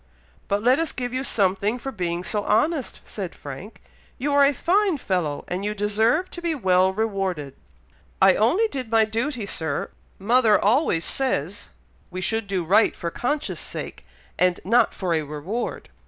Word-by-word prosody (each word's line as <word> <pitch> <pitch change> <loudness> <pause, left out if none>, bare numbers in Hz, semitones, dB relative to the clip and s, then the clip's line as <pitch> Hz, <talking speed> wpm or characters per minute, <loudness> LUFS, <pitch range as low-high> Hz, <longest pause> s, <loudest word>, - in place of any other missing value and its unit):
"But 205 +1 0
let 255 +4 +4
us 330 - -1
give 245 -1 -4
you 260 +1 -1
something 200 -1 +1
for 270 +2 -5
being 175 -5 -2
so 210 +2 -1
honest," 295 +4 0
said 190 -5 -6
Frank. 145 +10 -10 0.3
"You 285 +3 -1
are 285 0 +6
a 280 - +5
fine 370 +5 +1
fellow, 180 - -2
and 180 +2 -3
you 210 +1 -2
deserve 220 - +1
to 345 - -7
be 340 -2 -1
well 185 -6 +3
rewarded." 190 -9 -2 0.6
"I 190 0 +7
only 335 - +3
did 260 - -5
my 225 -1 +4
duty, 230 +2 -2
Sir. 160 -7 -3 0.3
Mother 225 +1 +4
always 210 - +2
says 205 - -2 0.4
we 185 - -6
should 220 +3 -1
do 190 -3 -1
right 200 +6 +4
for 170 - -4
conscience' 290 - -2
sake, - - -7 0.4
and 180 -1 +3
not 230 +3 +3
for 180 -3 -1
a 160 - +1
reward." 150 +11 -5
210 Hz, 170 wpm, -24 LUFS, 185-255 Hz, 0.6 s, I